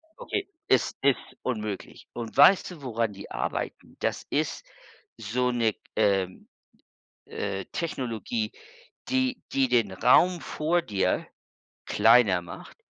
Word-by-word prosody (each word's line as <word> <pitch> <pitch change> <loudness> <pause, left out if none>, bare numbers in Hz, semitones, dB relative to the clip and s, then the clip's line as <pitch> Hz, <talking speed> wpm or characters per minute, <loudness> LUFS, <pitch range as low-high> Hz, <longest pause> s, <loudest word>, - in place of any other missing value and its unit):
okay, 395 -2 -4 0.2
es - - +3
ist 140 -1 +3 0.2
unmöglich. 110 -5 -5
Und 120 +1 -6
weißt 185 +6 +6
du, 160 -5 -11
woran 115 -4 -1
die 100 0 -10
arbeiten? - - -4
Das - - -2
ist - - -1 0.5
so 125 +3 0
'ne, 115 -3 +1 0.2
ähm, 95 -3 +1 0.8
äh, 95 -2 -4
Technologie, 165 - -3 0.6
die 260 -1 0
die 135 -1 +3
den 115 -6 +2
Raum 170 - +4
vor 170 +3 0
dir 100 - 0 0.6
kleiner 110 -6 +5
macht, 85 -1 -11
120 Hz, 115 wpm, -27 LUFS, 105-155 Hz, 0.8 s, weißt